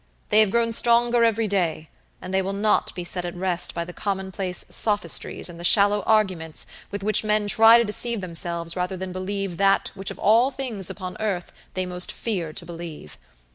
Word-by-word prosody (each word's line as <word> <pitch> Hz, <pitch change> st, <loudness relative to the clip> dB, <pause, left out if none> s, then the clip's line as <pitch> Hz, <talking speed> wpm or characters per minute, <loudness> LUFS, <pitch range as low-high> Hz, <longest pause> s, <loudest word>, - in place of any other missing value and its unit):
They 215 Hz, -, +4 dB
have 215 Hz, -2 st, +5 dB
grown 230 Hz, +2 st, +1 dB
stronger 235 Hz, +1 st, +3 dB
every 225 Hz, -1 st, +2 dB
day; 170 Hz, -5 st, -1 dB, 0.3 s
and 185 Hz, -, -6 dB
they 190 Hz, -, +3 dB
will 190 Hz, -, -4 dB
not 210 Hz, +2 st, +1 dB
be 180 Hz, -, -4 dB
set 180 Hz, +1 st, -3 dB
at 175 Hz, 0 st, -5 dB
rest 180 Hz, -1 st, 0 dB
by 170 Hz, 0 st, -2 dB
the 180 Hz, -, -9 dB
commonplace 190 Hz, -2 st, -3 dB
sophistries 205 Hz, -6 st, +1 dB
and 170 Hz, -1 st, -8 dB
the -, -, -8 dB
shallow 205 Hz, +2 st, +4 dB
arguments 185 Hz, -8 st, +1 dB, 0.2 s
with 200 Hz, -1 st, -6 dB
which 215 Hz, +1 st, +2 dB
men 215 Hz, 0 st, +1 dB
try 225 Hz, +2 st, +7 dB
to 235 Hz, -, +3 dB
deceive 230 Hz, +1 st, -3 dB
themselves 170 Hz, -2 st, -4 dB
rather 180 Hz, +1 st, -3 dB
than 185 Hz, 0 st, -5 dB
believe 185 Hz, -1 st, -4 dB
that 195 Hz, 0 st, +2 dB
which 195 Hz, 0 st, -4 dB
of -, -, -7 dB
all 230 Hz, +5 st, +4 dB
things 250 Hz, -9 st, -4 dB
upon 185 Hz, -2 st, -7 dB
earth 200 Hz, -5 st, -3 dB, 0.2 s
they 185 Hz, 0 st, -1 dB
most 180 Hz, 0 st, +1 dB
fear 180 Hz, -9 st, -4 dB
to -, -, -6 dB
believe. 165 Hz, -, -9 dB
195 Hz, 195 wpm, -23 LUFS, 180-215 Hz, 0.3 s, try